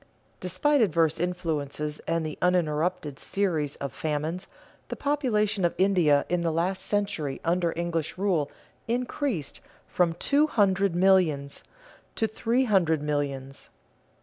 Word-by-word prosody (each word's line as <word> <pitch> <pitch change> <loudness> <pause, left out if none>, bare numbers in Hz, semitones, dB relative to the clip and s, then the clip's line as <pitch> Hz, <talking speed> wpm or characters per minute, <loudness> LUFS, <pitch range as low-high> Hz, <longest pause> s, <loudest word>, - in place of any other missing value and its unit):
Despite 185 - +1
adverse 165 -6 +2
influences 155 -4 -2
and 165 -1 0
the 155 - -4
uninterrupted 165 -3 0
series 165 -8 -1
of 140 -2 -5
famines, 160 +4 -3 0.4
the - - -3
population 220 -9 0
of 170 - +1
India 175 -7 +3
in 180 -1 0
the 170 -1 0
last 180 +4 0
century 195 -9 -1
under 170 0 +1
English 170 -1 -2
rule 180 -7 +1 0.4
increased 240 - -2 0.3
from 175 -2 +1
two 285 - +2
hundred 195 - +2
millions 175 -7 +2 0.5
to 225 - +1
three 230 +4 0
hundred 170 - +2
millions. 140 -2 -3
175 Hz, 120 wpm, -27 LUFS, 155-195 Hz, 0.5 s, India